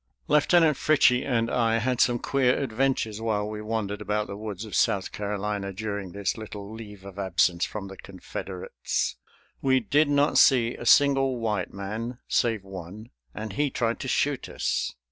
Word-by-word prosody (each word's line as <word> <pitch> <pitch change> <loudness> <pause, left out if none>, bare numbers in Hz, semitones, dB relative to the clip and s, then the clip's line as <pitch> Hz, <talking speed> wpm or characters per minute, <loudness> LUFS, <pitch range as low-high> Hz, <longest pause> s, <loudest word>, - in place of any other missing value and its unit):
Lieutenant 155 0 +4
Fritchie 130 -5 +4
and 115 -4 0
I 115 -2 +2
had 125 +2 0
some 120 -1 +3
queer 130 0 +1
adventures 120 -4 -1
while 105 -2 0
we 105 0 -5
wandered 105 -2 -3
about 105 0 -1
the 100 - -7
woods 105 0 -6
of 105 - -10
South 95 -2 +1
Carolina 105 -1 -3
during 100 -1 -4
this 100 +2 -2
little 105 -1 -8
leave 105 -3 -10
of 100 0 -9
absence 90 -2 +2
from 105 -2 -6
the 95 0 -10
Confederates. 95 -1 -4 0.4
We 130 -1 +3
did 145 +6 +2
not 145 0 +3
see 120 -3 +5
a 120 - -7
single 135 -2 +5
white 105 -5 -2
man, 110 +5 -5
save 115 -4 +1
one, 95 +3 -9 0.2
and 110 -2 -5
he 145 +7 +1
tried 115 -3 -1
to 135 - -5
shoot 140 +1 0
us. - - -2
110 Hz, 165 wpm, -26 LUFS, 100-125 Hz, 0.4 s, see